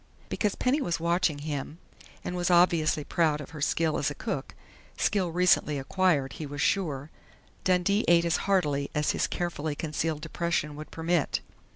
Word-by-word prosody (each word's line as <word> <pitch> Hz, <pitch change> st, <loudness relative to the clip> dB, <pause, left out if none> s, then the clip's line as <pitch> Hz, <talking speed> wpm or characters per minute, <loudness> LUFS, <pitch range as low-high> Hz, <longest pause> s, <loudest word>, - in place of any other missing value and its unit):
Because 210 Hz, -3 st, 0 dB
Penny 270 Hz, +4 st, +1 dB
was 175 Hz, -11 st, -1 dB
watching 170 Hz, -2 st, +1 dB
him 145 Hz, +1 st, -5 dB, 0.5 s
and 180 Hz, -, -4 dB
was 175 Hz, 0 st, 0 dB
obviously 170 Hz, -4 st, +4 dB
proud 155 Hz, -1 st, +1 dB
of 150 Hz, -, -9 dB
her 155 Hz, -3 st, -8 dB
skill 160 Hz, +2 st, +1 dB
as -, -, +1 dB
a -, -, -6 dB
cook -, -, -4 dB, 0.4 s
skill 190 Hz, -4 st, +1 dB
recently 175 Hz, -4 st, +3 dB
acquired, 145 Hz, -1 st, +1 dB
he 155 Hz, -, -6 dB
was 145 Hz, 0 st, -7 dB
sure 150 Hz, -5 st, 0 dB, 0.5 s
Dundee 185 Hz, +3 st, +2 dB
ate 170 Hz, 0 st, +5 dB
as 170 Hz, -, +2 dB
heartily 145 Hz, -8 st, +1 dB
as 150 Hz, 0 st, +2 dB
his -, -, 0 dB
carefully 160 Hz, -4 st, -3 dB
concealed 155 Hz, 0 st, -2 dB
depression 165 Hz, -2 st, -2 dB
would 155 Hz, +1 st, -8 dB
permit. 165 Hz, -2 st, 0 dB
165 Hz, 165 wpm, -28 LUFS, 150-180 Hz, 0.5 s, ate